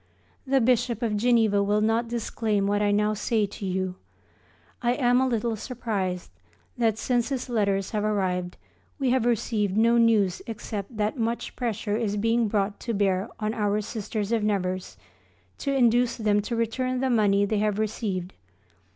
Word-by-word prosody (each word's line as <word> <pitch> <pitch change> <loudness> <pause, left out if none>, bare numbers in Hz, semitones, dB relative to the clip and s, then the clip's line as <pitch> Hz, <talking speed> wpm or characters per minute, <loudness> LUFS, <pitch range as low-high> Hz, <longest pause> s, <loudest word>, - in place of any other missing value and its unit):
The 270 0 +3
Bishop 245 -1 +1
of 220 -2 0
Geneva 220 -2 +3
will 205 +1 +2
not 225 +2 +1
disclaim 220 -3 -1
what 205 +1 +1
I 205 - +2
now 210 +1 +2
say 215 +1 0
to 200 0 -7
you. 185 0 -2 0.8
I 240 -1 +2
am 245 -2 +3
a 260 - +2
little 230 -2 0
surprised 210 - -3 0.4
that, 225 -3 +1
since 240 +1 0
his 265 -2 -3
letters 200 -4 0
have 210 -1 -1
arrived, 185 -4 -1 0.4
we 265 -3 +1
have 255 -2 +2
received 210 -4 0
no 235 +2 +4
news 215 -6 +3
except 220 -1 -6
that 215 +5 -1
much 230 +1 -2
pressure 220 -3 -2
is 210 -3 -1
being 230 +2 +2
brought 205 -1 -1
to 230 -2 -3
bear 195 0 +1
on 215 0 -1
our 210 -2 0
Sisters 210 0 -4
of 230 -2 +1
Nevers 185 - -2 0.6
to 280 - -1
induce 245 -2 +3
them 210 -2 +2
to 235 +3 -3
return 255 +3 -1
the 265 0 0
money 205 -3 +3
they 210 +1 0
have 210 -1 0
received. 205 -4 -2
215 Hz, 170 wpm, -26 LUFS, 205-235 Hz, 0.8 s, no